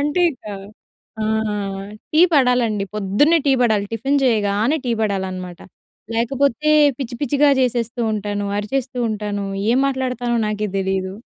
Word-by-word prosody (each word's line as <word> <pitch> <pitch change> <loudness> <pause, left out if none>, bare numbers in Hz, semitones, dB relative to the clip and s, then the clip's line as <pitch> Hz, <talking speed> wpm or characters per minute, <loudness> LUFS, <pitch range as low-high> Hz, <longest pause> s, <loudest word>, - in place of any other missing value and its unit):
అంటే 295 +5 +1
ఇక 260 - -20 0.8
ఆ! - - 0 0.9
టీ 310 - +4
పడాలండి, 245 -7 +2
పొద్దున్నే 215 - +3
టీ 275 - +5
పడాలి. 215 -4 +2
టిఫిన్ 270 +6 0
చేయగానే 220 +3 +2
టీ 245 - -1
పడాలనమాట. 185 -4 -3 0.6
లేకపోతే 270 +5 +1 0.3
పిచ్చి 255 -3 -5
పిచ్చిగా 285 0 +3
జేసేస్తూ 240 -1 -1
ఉంటాను. 205 -1 -3
అరిచేస్తూ 255 +4 -3
ఉంటాను. 210 -1 -3 0.3
ఏం 250 - +3
మాట్లాడతానో 250 -3 -1
నాకే 210 0 -2
తెలీదు. 190 0 -1
230 Hz, 125 wpm, -20 LUFS, 205-270 Hz, 0.9 s, టీ